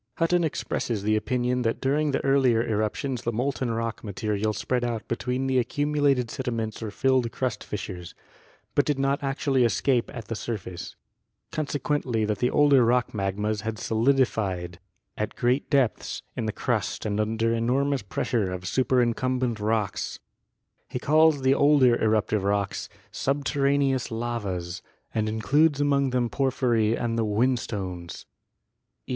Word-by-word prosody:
Hutton 175 +1 +2
expresses 120 -8 -2
the 110 +1 +2
opin 125 +3 -1
ion 125 0 +1
that 115 -1 0
during 145 +3 +1
the 135 - -1
earlier 130 -4 +3
eruptions 110 +4 -1
the 120 - -1
molten 125 +2 -1
rock 115 0 -3
material 105 0 -1
spread 120 +4 -1
out 115 -3 -3
between 125 +2 -2
the 130 -1 +2
accumulated 145 -1 +1
sediments 115 -5 -3
or 110 - -3
filled 130 +1 +1
crust 125 -5 -2
fissures, 90 -4 -6 0.6
but - - +3
did 145 -2 0
not 135 +1 +1
actually 135 -1 +1
escape 120 +2 +1
at 120 -5 -7
the - - -3
sur 115 +1 -3
face; 90 -2 -8 0.6
consequently 145 -6 -1
that 105 -2 -2
the 125 - +2
older 145 -3 +5
rock 120 +1 +2
magmas 105 +1 -1
had 110 0 -3
solidi 130 +6 +3
fied 90 -6 -4 0.4
at - - -2
great 125 +3 +1
depths 135 -6 0
in 115 - -2
the - - 0
crust - - -2
and 105 -1 -1
under 115 +1 +1
enormous 130 +4 +1
pressure 100 0 -1
of 90 0 -5
superincumbent 125 0 +1
rocks. 105 -1 -1 0.7
He - - -3
calls 155 +1 +4
the 130 +1 +5
older 140 -4 +5
eruptive 110 -2 +1
rocks 100 0 -1 0.2
"subterraneous 140 -1 +1
lavas" 105 -7 -3 0.3
and 110 -1 0
includes 140 +8 +2
among 140 -1 +2
them 125 -1 +1
porphyry 120 -4 +1
and 115 -1 -1
the - - +2
whinstones 105 -6 -2 0.8
(eq. - - -16
120 Hz, 150 wpm, -26 LUFS, 110-135 Hz, 0.8 s, older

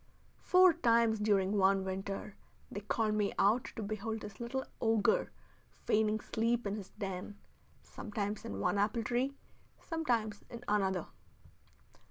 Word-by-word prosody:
Four 365 -1 +6
times 230 -7 +3
during 205 -1 +2
one 195 0 +3
winter 195 +2 -4 0.4
they 205 - -4
called 215 +1 0
me 210 -1 +1
out 220 +5 +3
to 225 - -4
behold 215 +2 -3
this 210 -1 -9
little 255 +3 -3 0.2
ogre 225 - +2 0.4
feigning 215 0 +1
sleep 230 +2 0
in 200 - -1
his 200 -3 -7
den, 195 -1 -6 0.5
sometimes 210 -1 -4
in 100 - -5
one 200 - +1
apple 215 +3 +1
tree, 250 +5 0 0.4
sometimes 235 -11 -1
in 235 0 -8
another. 190 -4 +1
215 Hz, 135 wpm, -33 LUFS, 200-230 Hz, 0.5 s, Four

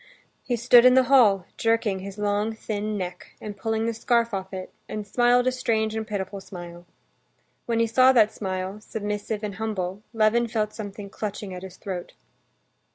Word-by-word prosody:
He 245 - -1
stood 235 +1 +6
in 255 0 +7
the 260 - +6
hall, 205 -8 +6
jerking 225 -4 +1
his 195 +1 -8
long 210 +1 0
thin 215 -1 -3
neck, 180 -2 -6
and 210 -1 -7
pulling 225 +2 -1
the 230 - 0
scarf 235 0 +1
off 190 -1 -4
it, 185 -1 -7 0.2
and 215 -1 -4
smiled 245 +3 +3
a 255 - +3
strange 220 -3 0
and 220 -1 -3
pitiful 200 -2 -4
smile. 175 -2 -10 0.8
When 230 -1 0
he 230 - +4
saw 255 +3 +5
that 220 -4 +4
smile, 190 0 -4
submissive 210 0 -4
and 205 -2 -4
humble, 195 -3 -3
Levin 225 +1 +3
felt 215 -2 -1
something 205 -2 -7
clutching 205 -2 -5
at 180 - -7
his 185 -1 -10
throat. 185 -4 -6
210 Hz, 175 wpm, -25 LUFS, 195-230 Hz, 0.8 s, in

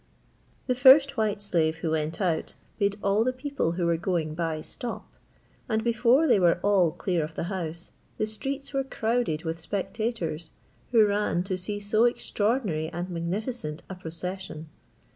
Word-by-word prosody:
The 255 - +2
first 270 +3 +7
white 215 -2 0
slave 165 -5 +1
who 160 0 -2
went 160 0 -1
out 170 -5 -1 0.2
made 200 0 +1
all 200 +2 +3
the 255 - +1
people 255 - -2
who 175 0 -1
were 170 -1 +2
going 165 -3 -1
by 160 -1 -2
stop; 235 +8 -6 0.6
and 220 0 +1
before 235 +5 +4
they 210 - +5
were 175 -1 +4
all 195 -4 +4
clear 175 0 -1
of 155 +1 -6
the - - -2
house, 170 -2 -5 0.3
the 215 - +1
streets 270 +7 -5
were 270 0 +1
crowded 230 -10 -1
with 165 0 -4
spectators, 185 -4 -2 0.4
who 225 -3 +6
ran 205 -3 +1
to 190 0 -2
see 205 +3 -3
so 215 +3 +3
extraordinary 210 -8 0
and 175 +2 -5
magnificent 175 - -3
a - - -3
procession. 180 -1 -6
190 Hz, 160 wpm, -27 LUFS, 165-225 Hz, 0.6 s, first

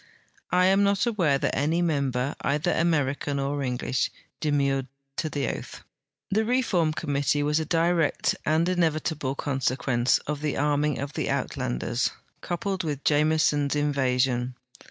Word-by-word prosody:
I 180 0 +3
am 195 +1 +4
not 200 +2 +2
aware 180 -12 +2
that - - -1
any 155 +4 +1
member, 140 -4 0
either 150 +5 0
American 145 -4 0
or 140 +1 -1
English, 125 -1 -1 0.3
demurred 140 -3 +1 0.3
to 155 - -1
the 140 -4 -2
oath. - - -7 0.5
The 215 +3 +2
reform 220 -9 +1
committee 145 -1 0
was 150 +1 +2
a 160 - -2
direct 165 0 +1
and 160 +2 +2
inevitable 155 -5 0
consequence 130 -3 +1
of 150 -1 -3
the 150 -2 -1
arming 145 0 +1
of 140 0 -5
the - - -2
Uitlanders, - - -1 0.3
coui^led 190 +1 -2
with 145 -3 -3
Jameson's 150 -1 +2
inva 140 -4 +1
sion. 125 -1 +1
145 Hz, 140 wpm, -26 LUFS, 140-165 Hz, 0.5 s, am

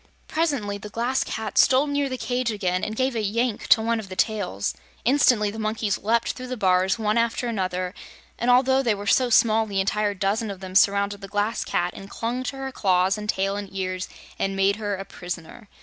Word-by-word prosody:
Presently 280 -11 -1
the 210 - -8
Glass 240 +5 0
Cat 220 -2 -2
stole 265 +2 +5
near 285 -1 0
the 255 - -3
cage 250 0 -1
again 185 -4 -1
and 215 - -2
gave 260 +2 0
a 225 - 0
yank 225 +2 -1
to 220 - +5
one 230 0 +1
of 205 -3 -8
the 185 - -7
tails. 200 - -1 0.3
Instantly 240 -5 +4
the 220 - -7
monkeys 215 -1 -1
leaped 230 +2 +1
through 255 0 -8
the 255 0 -4
bars, 185 -1 +2
one 215 0 +1
after 235 +1 0
another, 185 -4 -2 0.5
and 235 - 0
although 260 +2 +4
they 230 -5 +1
were 205 0 -7
so 250 +5 +3
small 225 -1 +4
the 200 -2 -1
entire 205 +1 0
dozen 205 +4 -1
of 195 -2 -6
them 190 -1 -8
surrounded 200 +1 +3
the 195 - -7
Glass 205 +3 -1
Cat 175 0 -1
and 195 - -10
clung 235 +4 -3
to 270 - -4
her 270 0 -4
claws 185 -4 +2
and 210 0 -6
tail 195 0 0
and 200 -1 -5
ears 185 -1 -3 0.3
and 195 0 -1
made 195 +1 +2
her 205 -2 -2
a 195 +1 -7
prisoner. 180 +5 -8
210 Hz, 215 wpm, -24 LUFS, 195-235 Hz, 0.5 s, stole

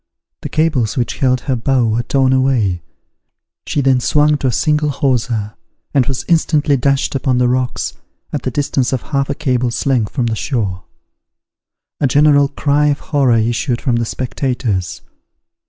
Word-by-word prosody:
The - - -5
cables 150 -7 0
which 120 - -2
held 130 -2 +2
her 135 -1 -1
bow 125 +1 +1
were 115 +1 0
torn 130 +1 +1
away: 120 -9 +1 0.9
she 145 - 0
then 135 -2 +3
swung 150 +4 +3
to 135 - -1
a - - +1
single 150 +4 +1
hawser, 120 -6 -1 0.4
and 135 -4 +2
was 130 -1 -3
instantly 155 -3 +2
dashed 140 +1 0
upon 130 -2 0
the 125 0 +3
rocks, 125 0 -1 0.4
at 145 - -2
the 130 - -2
distance 135 -1 -1
of 130 - -2
half 140 -2 -2
a 140 - -1
cable's 125 -5 -1
length 125 -6 +1
from 125 -4 -1
the 115 -1 -1
shore. 100 - -3 1.1
A 140 - +2
general 145 +1 +4
cry 145 +1 +1
of 145 -1 +1
horror 135 -5 +3
issued 120 +2 0
from 120 -4 0
the 115 - -1
spectators. 120 - -3
130 Hz, 165 wpm, -16 LUFS, 120-140 Hz, 1.1 s, general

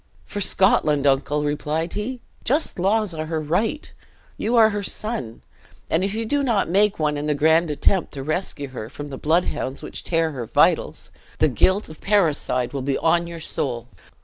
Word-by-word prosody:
"For 205 - -5
Scotland, 155 -7 +3
uncle," 140 +2 +2
replied 150 +3 -2
he; 235 +4 -4 0.2
"just 285 - 0
laws 205 +1 +1
are 155 -1 -4
her 160 -1 -2
right. 185 - -1 0.4
You 235 +3 -1
are 220 -2 +6
her 205 0 -2
son; 185 - -3 0.5
and 165 +3 +2
if 200 +2 -1
you 225 0 -2
do 285 +5 +1
not 235 -7 +1
make 200 +4 +3
one 150 -1 0
in 145 +1 -3
the 150 - +1
grand 160 +3 +3
attempt 170 +5 +1
to 135 - -5
rescue 155 -2 -2
her 120 -4 -7
from 145 +2 -8
the 135 - -6
bloodhounds 155 -4 0
which - - -6
tear 165 -2 0
her 125 -5 -6
vitals, - - +2 0.3
the - - +3
guilt 190 +3 +2
of 155 - -12
parricide 150 - +1
will 140 - -3
be 135 +1 0
on 170 +1 +2
your 170 -1 -7
soul! 125 -6 -3
160 Hz, 185 wpm, -23 LUFS, 145-200 Hz, 0.5 s, are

